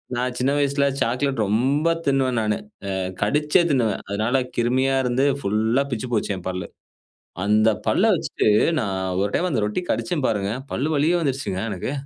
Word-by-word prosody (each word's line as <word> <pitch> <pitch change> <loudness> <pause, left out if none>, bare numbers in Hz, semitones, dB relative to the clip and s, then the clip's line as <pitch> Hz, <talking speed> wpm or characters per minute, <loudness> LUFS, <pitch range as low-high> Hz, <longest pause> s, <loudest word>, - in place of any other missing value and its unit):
நான் 125 0 -2
சின்ன 130 +2 +2
வயசுல 140 0 +1 0.2
சாக்லேட் 125 0 0
ரொம்ப 135 +9 +1 0.2
தின்னுவன் 130 -3 +2
நானு. 105 -1 0 0.4
அ - - -2 0.3
கடிச்சே 150 - +3
தின்னுவன் 115 -7 +1
அதனால 110 +6 0 0.2
கிருமியா 130 +3 +2
இருந்து 125 +2 +1
ஃபுல்லா 110 +5 +1
பிச்சு 115 +2 -3
போச்சு 105 -2 0
என் 90 0 -10
பல்லு. 90 -2 -4 0.8
அந்த 105 +2 +4 0.2
பல்ல - - +3
வச்சுட்டு - - -2 0.3
நான் 100 -5 -2 0.2
1 100 - 0
டைம் 180 - +1
அந்த 125 -8 0
ரொட்டி 105 +12 -2
கடிச்சேன் 175 -6 -1
பாருங்க. 100 -2 -1 0.2
பல்லு 145 +4 -1
வலியே 155 +5 +2
வந்துடுச்சுங்க 135 - -2
எனக்கு. 130 - -4
125 Hz, 160 wpm, -23 LUFS, 105-140 Hz, 0.8 s, அந்த